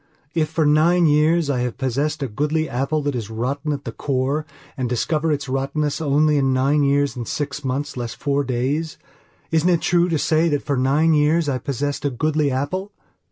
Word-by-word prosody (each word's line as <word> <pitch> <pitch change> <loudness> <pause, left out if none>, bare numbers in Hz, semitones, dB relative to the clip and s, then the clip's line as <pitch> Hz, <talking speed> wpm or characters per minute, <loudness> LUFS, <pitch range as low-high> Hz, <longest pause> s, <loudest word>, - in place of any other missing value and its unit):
If 160 -2 0
for 160 - 0
nine 165 +4 +4
years 155 +2 +3
I 140 -3 0
have 125 -1 -2
possessed 140 +3 -1
a - - -1
goodly 150 +7 -1
apple 140 +5 -1
that 145 0 -1
is 115 -4 -4
rotten 135 +7 -2
at 140 -1 -4
the - - -4
core 140 +3 -1 0.3
and 125 -2 -2
discover 155 +6 0
its 145 -2 -2
rottenness 140 +4 -1
only 150 0 +3
in 135 -1 +2
nine 135 +3 +2
years 140 -2 +2
and 120 -3 -5
six 145 0 -3
months 135 +2 -3
less 120 -2 -4
four 140 +1 0
days, 140 +5 -2 0.5
isn't 165 +2 +2
it 170 -2 +2
true 175 0 +2
to 165 - +1
say 155 +3 +2
that 145 -2 -1
for 140 - -1
nine 140 +5 +3
years 155 +2 +2
I 130 -3 0
possessed 140 +2 -3
a 145 - +1
goodly 150 +3 0
apple? 145 +10 -2
145 Hz, 200 wpm, -21 LUFS, 135-155 Hz, 0.5 s, nine